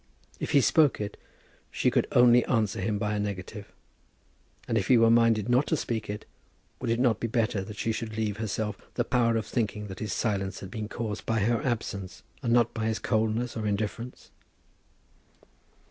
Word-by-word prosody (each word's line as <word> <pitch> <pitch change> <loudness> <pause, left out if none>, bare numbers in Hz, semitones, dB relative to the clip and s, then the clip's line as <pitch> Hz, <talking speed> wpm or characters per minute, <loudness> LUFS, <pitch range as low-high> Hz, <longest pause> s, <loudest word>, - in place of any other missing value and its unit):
If - - -3
he 140 - +6
spoke 150 +1 +4
it 105 0 -4 0.5
she - - +1
could - - +2
only 120 0 +6
answer 110 -6 0
him 105 +2 0
by 105 +1 -1
a 105 - -1
negative; 100 +1 -5 1.0
and - - -1
if 100 -3 +1
he 125 - +6
were 115 0 +5
minded 115 -2 +4
not 125 +4 +3
to 160 - +1
speak 115 -6 -3
it, 105 +1 -5 0.5
would 125 - -3
it 115 +1 +1
not 120 -4 +3
be 115 - -1
better 110 -4 0
that 105 +1 -9
she 115 - 0
should 110 -1 -4
leave 105 -2 -1
herself 110 -1 -3 0.2
the 120 - +1
power 115 -2 +2
of 110 - -2
thinking 105 -3 -2
that 95 - -8
his 105 -2 -3
silence 95 -2 -1
had 95 - -8
been 110 -2 -5
caused 110 -2 -4
by 115 -2 +1
her 115 +3 +1
absence, 105 -6 -3 0.2
and 115 - -1
not 120 -1 +3
by 110 -1 -2
his 110 0 0
coldness 110 +2 0
or 110 -2 -2
indifference? 110 +4 -4
110 Hz, 190 wpm, -28 LUFS, 105-120 Hz, 1.0 s, he